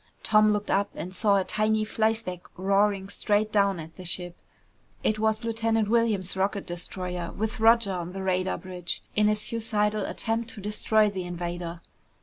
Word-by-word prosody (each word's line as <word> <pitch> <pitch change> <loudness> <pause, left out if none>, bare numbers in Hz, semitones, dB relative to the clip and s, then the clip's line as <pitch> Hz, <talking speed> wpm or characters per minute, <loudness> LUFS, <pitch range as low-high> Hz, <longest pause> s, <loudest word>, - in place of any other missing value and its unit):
Tom 215 0 +5
looked 210 0 -1
up 200 +1 +2
and 185 +2 -6
saw 200 +1 +3
a 195 - +2
tiny 215 +2 +1
flyspeck 220 -4 -1 0.2
roaring 195 +1 +2
straight 210 +1 0
down 200 -3 +2
at 160 0 -10
the 185 - -8
ship. 175 0 0 0.7
It 215 0 +1
was 220 0 +1
Lieutenant 225 -1 0
Williams' 220 -6 +2
rocket 195 +1 -1
destroyer, 175 0 -4
with 220 +1 -3
Roger 225 -2 +5
on 175 0 -4
the 195 0 -5
radar 185 0 0
bridge, 180 -2 -5
in 210 0 +4
a 210 - +3
suicidal 215 -1 -1
attempt 225 0 -2
to - - -8
destroy 210 +1 +2
the 185 -2 -4
invader. 175 -1 -5
205 Hz, 165 wpm, -27 LUFS, 185-215 Hz, 0.7 s, Tom